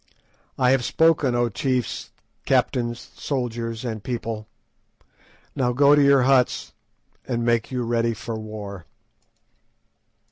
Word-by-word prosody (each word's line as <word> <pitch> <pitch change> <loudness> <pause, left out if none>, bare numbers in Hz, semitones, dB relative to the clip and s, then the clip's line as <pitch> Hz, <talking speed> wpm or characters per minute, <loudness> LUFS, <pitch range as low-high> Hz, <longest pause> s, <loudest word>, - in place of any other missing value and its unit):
I 125 0 +3
have 135 -2 +2
spoken, 150 -2 +3
O 120 0 +2
chiefs, 125 +3 -2 0.4
captains, 120 -1 0
soldiers, 120 -3 -3
and 110 -3 -4
people. 115 -3 -4 1.1
Now 125 -2 +1
go 140 +3 +5
to 145 - +5
your 140 -2 +5
huts 130 -1 +2 0.5
and 120 -2 -1
make 120 -1 +1
you 125 -1 -1
ready 115 0 0
for 115 +1 -6
war." 105 -4 -8
120 Hz, 115 wpm, -23 LUFS, 115-130 Hz, 1.1 s, go